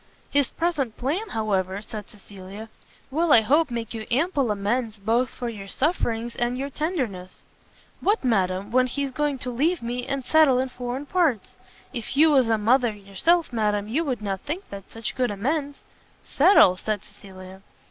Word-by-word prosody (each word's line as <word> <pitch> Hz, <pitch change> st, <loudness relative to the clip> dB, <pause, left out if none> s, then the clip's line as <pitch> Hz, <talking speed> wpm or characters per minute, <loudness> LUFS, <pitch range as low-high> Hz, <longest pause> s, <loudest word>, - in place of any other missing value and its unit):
"His 285 Hz, -2 st, +2 dB
present 300 Hz, -9 st, -2 dB
plan, 335 Hz, -, -2 dB
however," 195 Hz, -3 st, -1 dB
said 215 Hz, -2 st, -8 dB
Cecilia, 200 Hz, +1 st, -11 dB, 0.4 s
"will 320 Hz, +3 st, +1 dB
I 230 Hz, -, +8 dB
hope 290 Hz, +7 st, +3 dB
make 235 Hz, -2 st, -4 dB
you 220 Hz, -1 st, -6 dB
ample 280 Hz, -1 st, +1 dB
amends 215 Hz, +2 st, -1 dB
both 225 Hz, +5 st, +1 dB
for 245 Hz, -, -6 dB
your 205 Hz, -4 st, -7 dB
sufferings 235 Hz, -, -1 dB
and 240 Hz, +1 st, -1 dB
your 275 Hz, +2 st, -4 dB
tenderness." 255 Hz, -, -4 dB, 0.6 s
"What, 415 Hz, -1 st, +1 dB
madam, 195 Hz, -4 st, 0 dB
when 255 Hz, +1 st, +3 dB
he's 275 Hz, +2 st, -3 dB
going 290 Hz, +1 st, -1 dB
to 255 Hz, 0 st, -4 dB
leave 300 Hz, +6 st, 0 dB
me, 245 Hz, +1 st, -3 dB
and 275 Hz, -2 st, -3 dB
settle 310 Hz, -5 st, +5 dB
in 260 Hz, +1 st, 0 dB
foreign 250 Hz, +3 st, -5 dB
parts? 305 Hz, -, 0 dB, 0.4 s
If 240 Hz, +1 st, -4 dB
you 315 Hz, +1 st, +6 dB
was 260 Hz, -5 st, +4 dB
a 225 Hz, -, +3 dB
mother 240 Hz, +3 st, +3 dB
yourself, 210 Hz, -, 0 dB
madam, 210 Hz, -2 st, 0 dB
you 280 Hz, +10 st, 0 dB
would 255 Hz, -8 st, -3 dB
not 195 Hz, -2 st, -3 dB
think 335 Hz, +7 st, -5 dB
that 200 Hz, -1 st, -9 dB
such 225 Hz, -1 st, -4 dB
good 250 Hz, -1 st, 0 dB
amends." 280 Hz, +8 st, -2 dB, 0.5 s
"Settle?" 285 Hz, -, +5 dB
said 210 Hz, 0 st, -3 dB
Cecilia. 190 Hz, -2 st, -13 dB
245 Hz, 170 wpm, -24 LUFS, 210-285 Hz, 0.6 s, I